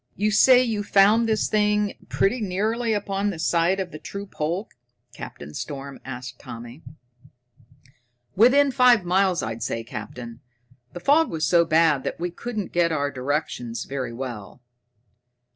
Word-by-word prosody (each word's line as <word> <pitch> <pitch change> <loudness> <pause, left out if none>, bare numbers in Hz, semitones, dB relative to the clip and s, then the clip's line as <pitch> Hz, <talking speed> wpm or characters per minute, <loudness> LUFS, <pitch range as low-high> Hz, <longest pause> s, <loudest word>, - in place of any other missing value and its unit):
"You 210 +2 0
say 250 +4 +6
you 225 -4 -1
found 205 +3 +4
this 215 -1 +1
thing 210 -1 +1 0.2
pretty 230 +5 +1
nearly 220 +4 -1
upon 205 -1 -1
the 190 - -5
site 170 +3 +1
of 185 -2 -4
the 155 - -9
true 200 +6 -7
pole?" 175 +3 -3 0.5
Captain 75 +1 -9
Storm 140 - -6
asked 125 -1 -8
Tommy. 120 +5 -10 1.5
"Within 270 +7 +5
five 245 -6 +4
miles, 185 0 +2
I'd 110 +1 -5
say, 115 - -3
Captain. 115 +1 -8 0.5
The 175 - -6
fog 300 - +3
was 155 -1 -1
so 170 +1 +4
bad 160 -3 +3
that - - -4
we 175 +1 -3
couldn't 215 +1 -5
get 170 -1 +2
our 145 -2 -1
directions 125 -4 -3
very 130 -3 -4
well." 120 -5 -7
175 Hz, 145 wpm, -24 LUFS, 135-210 Hz, 1.5 s, say